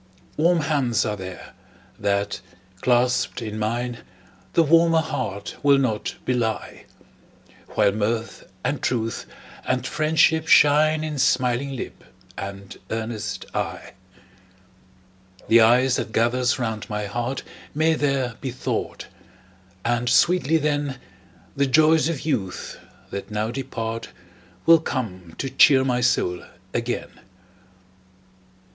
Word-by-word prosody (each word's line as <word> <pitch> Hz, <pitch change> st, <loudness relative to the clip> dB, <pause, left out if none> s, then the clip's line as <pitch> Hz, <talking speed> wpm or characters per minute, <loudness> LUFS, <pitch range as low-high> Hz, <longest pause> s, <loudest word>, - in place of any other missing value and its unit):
Warm 170 Hz, +2 st, +3 dB
hands 135 Hz, -6 st, +1 dB
are 105 Hz, -, -1 dB
there, 95 Hz, -2 st, -9 dB, 0.5 s
that, 100 Hz, -1 st, -1 dB, 0.4 s
clasped 125 Hz, 0 st, +2 dB
in 110 Hz, -2 st, -5 dB
mine, 120 Hz, +3 st, -2 dB, 0.5 s
The 165 Hz, -, +5 dB
warmer 165 Hz, +1 st, +4 dB
heart 100 Hz, -10 st, -4 dB
will 140 Hz, -1 st, +5 dB
not 115 Hz, -6 st, -1 dB
belie; 115 Hz, -4 st, -2 dB, 0.9 s
While -, -, +4 dB
mirth, 110 Hz, +2 st, -3 dB
and -, -, -1 dB
truth, 115 Hz, -3 st, -2 dB, 0.4 s
and -, -, -1 dB
friendship 160 Hz, +1 st, +2 dB
shine 155 Hz, +1 st, +5 dB
In 150 Hz, -2 st, -3 dB
smiling 130 Hz, +1 st, +1 dB
lip -, -, -7 dB, 0.3 s
and 100 Hz, 0 st, -7 dB
earnest 110 Hz, -3 st, -4 dB
eye. -, -, -4 dB, 1.5 s
The 115 Hz, 0 st, +6 dB
ice 125 Hz, +3 st, +4 dB
that 110 Hz, -, -3 dB
gathers 120 Hz, +3 st, +1 dB
round 110 Hz, -4 st, -3 dB
my 105 Hz, -1 st, -2 dB
heart 120 Hz, +5 st, -3 dB, 0.3 s
May 160 Hz, +2 st, +3 dB
there 135 Hz, -6 st, 0 dB
be 135 Hz, -, -3 dB
thawed; 130 Hz, +1 st, -4 dB, 0.8 s
and 120 Hz, +1 st, +1 dB
sweetly, 165 Hz, +3 st, +4 dB
then, 145 Hz, -3 st, -1 dB, 0.6 s
The 140 Hz, 0 st, +2 dB
joys 155 Hz, +3 st, +4 dB
of 160 Hz, -5 st, -3 dB
youth, 100 Hz, -, -3 dB, 0.3 s
that 100 Hz, -, -5 dB
now 105 Hz, +1 st, -2 dB
depart, 115 Hz, -3 st, -4 dB, 0.6 s
Will 165 Hz, 0 st, +7 dB
come 95 Hz, -, -5 dB
to 135 Hz, -, -3 dB
cheer 135 Hz, 0 st, +5 dB
my 125 Hz, -1 st, +1 dB
soul 90 Hz, -7 st, +1 dB, 0.3 s
again. -, -, -2 dB
125 Hz, 115 wpm, -23 LUFS, 110-145 Hz, 1.5 s, Will